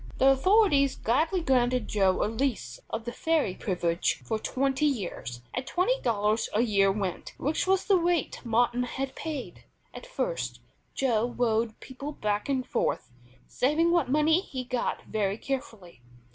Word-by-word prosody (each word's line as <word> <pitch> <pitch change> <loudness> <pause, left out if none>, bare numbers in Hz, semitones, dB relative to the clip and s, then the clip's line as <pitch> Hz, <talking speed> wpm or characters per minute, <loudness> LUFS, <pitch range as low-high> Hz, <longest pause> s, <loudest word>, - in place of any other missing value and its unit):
The 270 - +5
authorities 285 -1 +4
gladly 320 - +1
granted 255 -4 +2
Joe 190 -3 +2
a - - +2
lease 220 - -2
of 225 +1 -4
the 240 - -3
ferry 310 - 0
privilege 175 -3 -1
for 220 -1 -1
twenty 270 +5 0
years, 175 - -4
at 255 +1 -4
twenty 485 +8 +1
dollars 215 -1 +1
a 215 - +4
year 200 -4 +3
rent, 195 -2 -3
which 305 +6 -1
was 380 0 +2
the 395 -3 +4
rate 340 -4 0
Martin 240 +1 +2
had 265 +2 -3
paid. 305 -5 -6 0.3
At - - -9
first - - -3 0.4
Joe 240 -2 0
rowed 225 -2 0
people 275 +3 -7
back 210 -1 -2
and 260 -2 0
forth, 195 - -1 0.4
saving 310 +6 +2
what 340 -7 +2
money 305 +4 +4
he 260 -9 -6
got 250 -1 -2
very 205 -2 -1
carefully. 225 - -6
255 Hz, 155 wpm, -28 LUFS, 215-300 Hz, 0.4 s, The